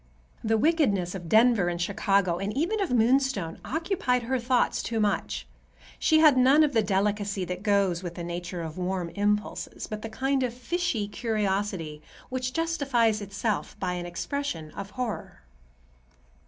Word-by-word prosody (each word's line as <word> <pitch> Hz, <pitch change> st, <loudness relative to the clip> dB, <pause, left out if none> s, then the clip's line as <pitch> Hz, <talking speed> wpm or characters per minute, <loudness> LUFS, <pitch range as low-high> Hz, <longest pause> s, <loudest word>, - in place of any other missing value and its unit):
The 225 Hz, 0 st, +2 dB
wickedness 215 Hz, -, +2 dB
of 175 Hz, -4 st, -7 dB
Denver 220 Hz, -3 st, +5 dB
and 175 Hz, -1 st, -2 dB
of -, -, +1 dB
Chicago, 195 Hz, -2 st, +1 dB
and 195 Hz, +1 st, -2 dB
even 390 Hz, +8 st, 0 dB
of 390 Hz, -, 0 dB
Moonstone, 245 Hz, -7 st, +2 dB
occupied 310 Hz, -6 st, 0 dB
her 260 Hz, +2 st, 0 dB
thoughts 245 Hz, +1 st, +1 dB
too 230 Hz, -1 st, -2 dB
much. 210 Hz, -1 st, -1 dB, 0.5 s
She 315 Hz, -, +4 dB
had 305 Hz, -4 st, +6 dB
none 270 Hz, +5 st, +6 dB
of 295 Hz, -2 st, +1 dB
the 225 Hz, -, +4 dB
delicacy 200 Hz, -1 st, 0 dB
that 180 Hz, +1 st, -5 dB
goes 200 Hz, -4 st, +2 dB
with 175 Hz, -1 st, -6 dB
a 170 Hz, -, -4 dB
nature 175 Hz, 0 st, -4 dB
of 160 Hz, +2 st, -6 dB
warm 180 Hz, -1 st, -2 dB
impulses, 210 Hz, +2 st, -2 dB
but 215 Hz, 0 st, -6 dB
the 225 Hz, -, -5 dB
kind 265 Hz, +4 st, 0 dB
of 245 Hz, -2 st, -1 dB
fishy 255 Hz, -, -1 dB
curiosity 200 Hz, -8 st, -2 dB, 0.3 s
which 255 Hz, 0 st, -2 dB
justifies 270 Hz, -9 st, +1 dB
itself 200 Hz, +2 st, -3 dB
by 180 Hz, -2 st, -1 dB
an 175 Hz, 0 st, -4 dB
expression 175 Hz, -, -4 dB
of 200 Hz, +3 st, -7 dB
horror. 240 Hz, -1 st, -5 dB
210 Hz, 160 wpm, -27 LUFS, 185-255 Hz, 0.5 s, had